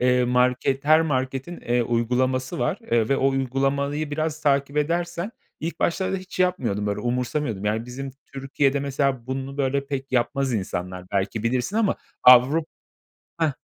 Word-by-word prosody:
eee, 125 Hz, 0 st, +3 dB
market 125 Hz, +2 st, +1 dB
her 155 Hz, +1 st, +6 dB
marketin, 135 Hz, +1 st, -2 dB
eee, 120 Hz, 0 st, +1 dB
uygulaması 125 Hz, +3 st, 0 dB
var, 120 Hz, -, 0 dB
eee, 115 Hz, -2 st, +2 dB
ve 140 Hz, -, +3 dB
o 135 Hz, -, +3 dB
uygulamayı 135 Hz, +3 st, -1 dB
biraz 155 Hz, +1 st, -2 dB
takip 140 Hz, -1 st, +1 dB
edersen 170 Hz, +6 st, -1 dB, 0.3 s
ilk 165 Hz, +3 st, -4 dB
başlarda 190 Hz, +2 st, 0 dB
hiç 185 Hz, 0 st, -9 dB
yapmıyordum, 130 Hz, -, 0 dB
böyle, 100 Hz, 0 st, -1 dB
umursamıyordum. 125 Hz, -3 st, -2 dB
Yani, 110 Hz, +2 st, -1 dB
bizim 135 Hz, +2 st, -6 dB, 0.2 s
Türkiye'de 135 Hz, +1 st, 0 dB
mesela 135 Hz, -3 st, -1 dB
bunu 135 Hz, +1 st, -4 dB
böyle 140 Hz, 0 st, 0 dB
pek 135 Hz, -1 st, -5 dB
yapmaz 130 Hz, +2 st, +1 dB
insanlar 90 Hz, -2 st, -4 dB
belki 100 Hz, +2 st, -1 dB
bilirsin 125 Hz, -, 0 dB
ama 220 Hz, -3 st, +2 dB, 0.3 s
Avru 125 Hz, +6 st, +7 dB, 0.8 s
Heh. 160 Hz, -3 st, +2 dB
135 Hz, 150 wpm, -24 LUFS, 125-145 Hz, 0.8 s, Avru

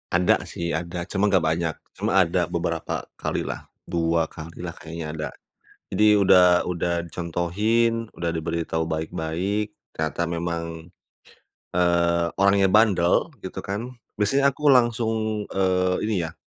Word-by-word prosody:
Ada 90 Hz, +1 st, +3 dB
sih 85 Hz, -2 st, -4 dB
ada, 85 Hz, +2 st, -4 dB
cuma 100 Hz, +2 st, +1 dB
nggak 95 Hz, -, +5 dB
banyak, 80 Hz, 0 st, -1 dB, 0.2 s
cuma -, -, +1 dB
ada -, -, +3 dB
beberapa -, -, -3 dB
kali -, -, -3 dB
lah, -, -, -5 dB, 0.2 s
2 85 Hz, -1 st, +1 dB
kali 80 Hz, +1 st, -10 dB
lah 85 Hz, -1 st, -5 dB
kayaknya 80 Hz, -1 st, -7 dB
ada. 75 Hz, -1 st, -3 dB, 0.6 s
Jadi 105 Hz, +2 st, +5 dB
udah 90 Hz, -3 st, +6 dB
udah 85 Hz, -1 st, -1 dB
dicontohin, 105 Hz, +8 st, 0 dB
udah 85 Hz, -1 st, -2 dB
diberitahu 80 Hz, 0 st, -2 dB
baik-baik, 85 Hz, +6 st, -2 dB, 0.2 s
ternyata 80 Hz, +1 st, -2 dB
memang, 85 Hz, -1 st, -4 dB, 0.8 s
eee, 85 Hz, -1 st, +2 dB
orangnya 100 Hz, 0 st, +4 dB
bandel, 100 Hz, -, +3 dB
gitu 95 Hz, -1 st, -7 dB
kan, 105 Hz, +5 st, -3 dB, 0.3 s
di 105 Hz, -, +3 dB
sini 135 Hz, +5 st, +2 dB
aku 140 Hz, +2 st, +2 dB
langsung, 115 Hz, -4 st, +2 dB
eee, 90 Hz, -1 st, +1 dB
ini 100 Hz, -6 st, 0 dB
ya, 80 Hz, -, -11 dB
90 Hz, 135 wpm, -24 LUFS, 85-105 Hz, 0.8 s, udah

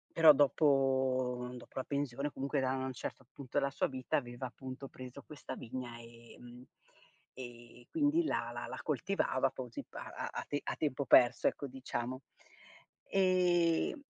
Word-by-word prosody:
Però 160 Hz, -2 st, +9 dB
dopo 135 Hz, -3 st, +3 dB
uhm, 125 Hz, 0 st, -5 dB
dopo -, -, -13 dB
la 130 Hz, -, 0 dB
pensione 140 Hz, 0 st, -2 dB
comunque 140 Hz, +2 st, -1 dB
da 130 Hz, 0 st, +1 dB
un 130 Hz, 0 st, -2 dB
certo 130 Hz, +1 st, -6 dB
punto 140 Hz, 0 st, -6 dB
della 140 Hz, -1 st, +3 dB
sua 140 Hz, -, 0 dB
vita 130 Hz, +4 st, -1 dB
aveva 120 Hz, -1 st, -4 dB
appunto 130 Hz, +2 st, -8 dB
preso 130 Hz, +2 st, -9 dB
questa 150 Hz, -2 st, -7 dB
vigna 120 Hz, 0 st, -6 dB
e 115 Hz, 0 st, -14 dB
mhmm, 120 Hz, 0 st, -12 dB, 0.7 s
e 120 Hz, -1 st, -11 dB
quindi 320 Hz, +2 st, +3 dB
la 120 Hz, -, -1 dB
la 120 Hz, -, -4 dB
la -, -, -6 dB
coltivava 145 Hz, -4 st, +1 dB
così 125 Hz, -3 st, -6 dB
pa -, -, -8 dB
a -, -, -5 dB
a -, -, -4 dB
te 145 Hz, -, -1 dB
a -, -, -2 dB
tempo 140 Hz, -2 st, -1 dB
perso 120 Hz, -1 st, +6 dB
ecco, 140 Hz, -, -1 dB
diciamo. 130 Hz, 0 st, -4 dB, 0.8 s
E 180 Hz, -, +3 dB
130 Hz, 160 wpm, -34 LUFS, 125-145 Hz, 0.8 s, Però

